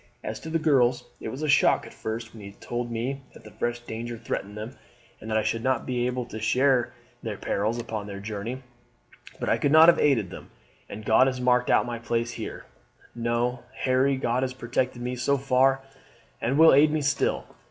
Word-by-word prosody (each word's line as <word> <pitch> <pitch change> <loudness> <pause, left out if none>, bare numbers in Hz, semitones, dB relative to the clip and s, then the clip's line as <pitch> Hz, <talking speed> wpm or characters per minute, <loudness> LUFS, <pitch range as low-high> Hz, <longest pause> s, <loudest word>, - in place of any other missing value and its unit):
As 110 0 -4
to 160 - -8
the 165 - +1
girls, 130 -6 +2
it - - -6
was 130 +7 -6
a - - 0
shock 145 - +4
at - - -12
first 110 +1 -5
when 110 - -11
you 100 0 -9
told 120 +3 -4
me 125 +4 -3
that - - -15
fresh 120 0 -1
danger 120 0 -6
threatened 105 -2 -5
them, 110 +5 -7 0.4
and 110 - -9
that 110 - +1
I 110 - +1
should 115 0 -1
not 130 -2 0
be 125 -1 -1
able 125 -1 -2
to 110 -2 -8
share 125 +3 +2 0.3
their - - -4
perils 110 +4 -1
upon 110 -3 -5
their 100 -1 -7
journey; 110 +5 -5 0.8
but - - -3
I - - +2
could 145 - +1
not 160 +2 +9
have 170 - +4
aided 115 -11 +2
them, - - -10 0.4
and 105 +1 -8
God 110 +5 +5
has 130 -1 -2
marked 125 0 +2
out - - +4
my 120 -1 -4
place 115 0 -1
here. - - -7 0.5
No, 120 +1 -1 0.2
Harry, 130 +1 +2
God 125 -1 0
has 130 -1 -2
protected 120 0 -2
me 125 +1 -2
so 135 +3 +1
far, 135 0 +3 0.6
and 130 +4 0
will 160 +1 +8
aid 145 +3 +6
me 155 0 0
still. 140 0 0
120 Hz, 205 wpm, -26 LUFS, 115-130 Hz, 0.8 s, not